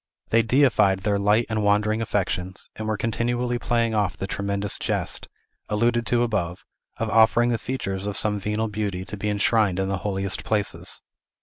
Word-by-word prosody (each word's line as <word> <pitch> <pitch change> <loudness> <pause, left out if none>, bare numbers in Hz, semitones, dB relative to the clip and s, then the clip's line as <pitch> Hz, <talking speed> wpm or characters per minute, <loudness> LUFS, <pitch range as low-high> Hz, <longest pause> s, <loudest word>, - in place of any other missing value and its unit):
They 115 - +4
deified 115 -6 +3
their 100 0 +1
light 105 +3 +3
and 110 -2 -1
Wandering 105 +2 +2
affections, 95 -3 -2
and 110 - -5
were 110 -1 0
continually 120 +2 -1
playing 115 -1 +1
off 105 -3 0
the - - -3
tremendous 100 0 -2
jest, - - -2 0.4
alluded 115 +2 +1
to 120 +2 +3
above, 95 -7 -2 0.3
of 115 -1 -2
offering 120 +2 +5
the 115 - 0
features 100 -7 -3
of 105 - -3
some 105 -1 0
venal 105 +3 -1
beauty 100 -3 -3
to 105 - -5
be 105 +1 -2
enshrined 105 -2 +2
in 95 0 0
the 95 - 0
holiest 95 -2 -2
places. 105 -2 -1
105 Hz, 175 wpm, -24 LUFS, 100-115 Hz, 0.4 s, offering